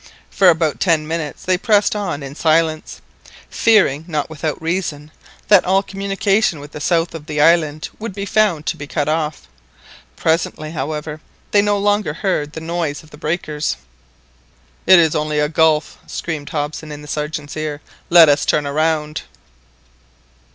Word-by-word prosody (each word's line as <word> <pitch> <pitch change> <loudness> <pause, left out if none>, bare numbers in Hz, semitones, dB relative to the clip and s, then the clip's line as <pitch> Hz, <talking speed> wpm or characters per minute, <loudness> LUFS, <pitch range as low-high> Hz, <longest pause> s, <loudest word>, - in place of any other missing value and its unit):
For 195 -2 +5
about 160 -3 +1
ten 160 -4 +2
minutes 160 -4 -4
they 185 -1 +1
pressed 210 -1 +2
on 180 -8 -3
in 135 0 -7
silence, 160 0 0 0.5
fearing, 195 -10 +3
not 155 -2 -3
without 155 -1 -3
reason, 160 -3 -3 0.4
that 205 -3 +6
all 190 +2 +2
communication 195 -2 0
with 145 +1 -11
the - - -8
south 165 +1 +1
of 160 -2 -9
the 150 -2 -3
island 155 -1 +3
would 225 0 -5
be 200 -1 -4
found 200 -7 +1
to - - -2
be 145 - -7
cut 145 0 -2
off. 155 -1 -2 0.7
Presently, 160 -1 -1
however, 150 +1 -4 0.3
they 205 - +5
no 205 0 +1
longer 205 -5 0
heard 155 -5 -1
the 160 - -6
noise 165 -3 -3
of 155 - -19
the - - -11
breakers. 155 - -2 1.1
"It 185 +1 +9
is 160 -3 +4
only 150 0 -1
a 150 - +2
gulf." 160 0 +1
screamed 155 -4 -5
Hobson 150 +1 -4
in 150 0 -8
the - - -11
Sergeant's 150 0 -4
ear. 155 -2 -4 0.3
"Let 170 -2 +8
us 145 0 +3
turn 150 -1 +1
round." 150 +1 0
160 Hz, 160 wpm, -19 LUFS, 150-180 Hz, 1.1 s, It